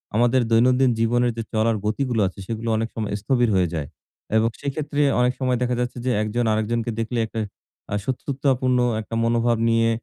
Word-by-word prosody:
আমাদের 120 +3 +3
দৈনন্দিন 125 +3 +4
জীবনের 120 +1 +2
যে 115 - -2
চলার 110 +1 +2
গতিগুলো 120 +1 0
আছে, 95 - -9
সেগুলো 115 0 -3
অনেক 115 +1 -1
সময় 110 -3 -3
স্থবির 120 +1 +2
হয়ে 90 -2 +3
যায় 75 -4 -3 0.5
এবং 115 +1 +3
সেক্ষেত্রে 145 +1 -2 0.2
অনেক 125 0 +3
সময় 130 -2 +1
দেখা 125 0 +1
যাচ্ছে 125 +1 -2
যে, 130 - +2
একজন 115 +3 -1
আরেকজনকে 115 +2 -1
দেখলে 115 +1 -1
একটা 110 0 -5 0.5
আ - - +2
শত্রুতাপূর্ণ 130 -1 0 0.2
একটা 110 +1 -7
মনোভাব 115 0 +2
নিয়ে 115 0 +3
120 Hz, 175 wpm, -23 LUFS, 115-125 Hz, 0.5 s, দৈনন্দিন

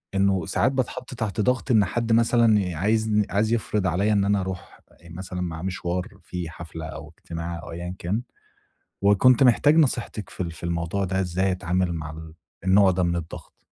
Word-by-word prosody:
إنه 95 -3 +2
ساعات 130 - +2
باتحط 130 -1 -3
تحت 110 -1 -2
ضغط 125 +3 0
إن 105 -4 +5
حد 115 +4 -1
مثلًا 110 -6 +3
عايزن 105 +2 +2
عايز 110 +3 +1
يفرض 105 -4 0
عليّا 100 +4 +1
إن 100 -1 +2
أنا 100 -1 +2
أروح 95 -1 -7 0.3
مثلًا 90 +2 -6
معاه 80 -3 -4
مشوار، 90 +1 -3
فيه 90 -2 -5
حفلة 80 -1 -8
أو 75 0 -9
اجتماع 85 0 -6
أو - - -9
أيًّا 90 +2 -6
كان، 100 +7 -1 0.8
وكنت 115 +6 +5
محتاج 140 +4 +5
نصيحتِك 125 - 0
في - - -4
ال 85 - -4
في 80 - -13
الموضوع 85 +3 -1
ده، 95 +1 -1
إزاي 95 +1 0
أتعامل 90 0 -1
مع 80 -2 -5
ال 80 0 -10 0.3
النوع 95 0 +5
ده 90 0 0
من 85 0 +1
الضغط؟ 85 -1 -9
95 Hz, 180 wpm, -24 LUFS, 85-110 Hz, 0.8 s, إن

